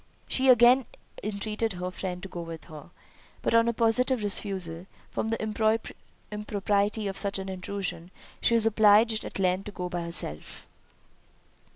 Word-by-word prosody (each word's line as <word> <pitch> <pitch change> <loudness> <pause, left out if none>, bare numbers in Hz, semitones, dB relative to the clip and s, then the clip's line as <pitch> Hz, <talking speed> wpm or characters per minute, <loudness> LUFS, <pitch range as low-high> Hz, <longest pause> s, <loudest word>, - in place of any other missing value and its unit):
She 265 0 +2
again 245 +1 +6 0.4
entreated 215 +1 -3
her 180 0 -4
friend 180 0 -5
to - - -5
go 175 -2 -7
with 165 -1 -8
her; 155 0 -12 0.5
but - - 0
on 230 0 +5
a - - +3
positive 235 +1 +2
refusal, 190 -4 0 0.2
from - - -2
the 225 0 -2 0.9
impropriety 210 0 -1
of 195 - -4
such 200 -1 +1
an 190 0 -5
intrusion, 185 -2 -4 0.3
she 235 - +3
was 225 -1 +4
obliged 220 +1 +4
at - - -6
length 185 0 0
to 210 - -6
go 180 -2 -5
by 175 0 -3
herself. 170 - -4
200 Hz, 155 wpm, -27 LUFS, 180-225 Hz, 0.9 s, again